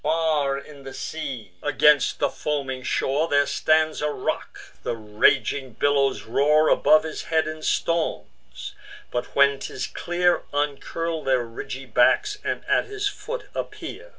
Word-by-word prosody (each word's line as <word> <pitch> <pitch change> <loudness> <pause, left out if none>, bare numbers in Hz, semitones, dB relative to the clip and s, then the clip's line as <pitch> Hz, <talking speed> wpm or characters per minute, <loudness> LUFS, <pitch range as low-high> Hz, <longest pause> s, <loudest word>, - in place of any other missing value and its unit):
Far 155 -3 +1
in 140 0 -11
the 135 0 -9
sea, 135 - -5
against 145 0 +3
the - - 0
foaming 135 -3 -3
shore, 140 +4 0
There 145 -2 +3
stands 155 +1 +1
a 150 - +1
rock: 135 - -3 0.2
the - - -2
raging 115 +4 +1
billows 140 +2 +1
roar 150 +6 +3
Above 155 0 +5
his 160 -1 -6
head 160 -1 +1
in 155 0 -6
storms; 65 - -2 0.4
but, 120 - -4
when 140 0 +4
'tis - - -4
clear, 175 0 0
Uncurl 150 +3 -2
their 130 -2 +2
ridgy 125 +3 -7
backs, 410 - +2
and - - -3
at - - +2
his 415 0 -2
foot 475 +4 -5
appear. - - -6
145 Hz, 145 wpm, -24 LUFS, 130-160 Hz, 0.4 s, Above